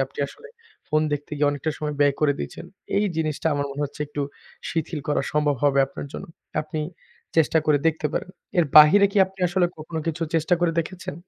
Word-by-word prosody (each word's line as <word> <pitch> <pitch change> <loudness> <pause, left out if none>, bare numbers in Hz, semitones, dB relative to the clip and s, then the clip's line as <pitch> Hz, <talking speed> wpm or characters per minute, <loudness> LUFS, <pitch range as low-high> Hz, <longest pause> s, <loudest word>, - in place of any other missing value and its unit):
আপনি 135 - -17
আসলে 460 - -13 0.4
ফোন 155 0 +2
দেখতে 145 +1 -3
গিয়ে 145 0 +3
অনেকটা 145 +2 -2
সময় 150 -1 -3
ব্যয় 145 -1 +4
করে 150 -2 +4
দিচ্ছেন। - - -6 0.3
এই 205 - +3
জিনিসটা 155 -1 -1
আমার 145 0 -1
মনে 140 +1 -4
হচ্ছে 145 - -9
একটু 145 0 -5 0.5
শিথিল 160 -1 -2
করা 145 - +1
সম্ভব 150 -2 +2
হবে 140 -1 +3
আপনার 140 +1 -8
জন্য। - - -7 0.4
আপনি 155 0 -4 0.6
চেষ্টা 160 0 +4
করে 150 -1 +4
দেখতে 155 -1 +1
পারেন। 185 - -3 0.3
এর 175 - +5
বাহিরে 160 +7 +9
কি 205 - +2
আপনি 190 +1 -18
আসলে 175 0 +2
কখনো 160 +1 -5
কিছু 165 0 -2
চেষ্টা 165 +2 +3
করে 175 -1 +2
দেখেছেন? 180 -1 -7
155 Hz, 195 wpm, -24 LUFS, 145-165 Hz, 0.6 s, বাহিরে